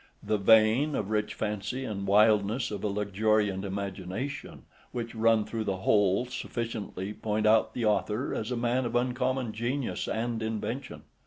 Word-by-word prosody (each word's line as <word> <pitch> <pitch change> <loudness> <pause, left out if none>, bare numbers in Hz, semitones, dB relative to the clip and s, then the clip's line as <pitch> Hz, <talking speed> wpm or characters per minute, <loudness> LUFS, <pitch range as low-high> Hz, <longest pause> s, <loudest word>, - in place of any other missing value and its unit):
The 105 - 0
vein 110 +8 +5
of 105 0 -2
rich 105 -1 0
fancy, 105 +5 -3
and 100 -3 -4
wildness 105 +4 +3
of 100 -2 -5
a - - +1
luxuriant 105 0 +1
imagination, 100 +7 -5 0.3
which 115 -2 -4
run 110 -1 +3
through 110 -1 -3
the 95 -2 -1
whole, 100 +3 +3
sufficiently 110 -5 -4
point 105 0 -1
out 110 +1 +4
the 120 - -1
author 105 +3 0
as 110 - -3
a 125 - -1
man 120 +2 +1
of 120 0 -3
uncommon 125 -1 0
genius 120 +4 -2
and 115 0 -2
invention. 115 +4 -4
110 Hz, 155 wpm, -29 LUFS, 105-120 Hz, 0.3 s, vein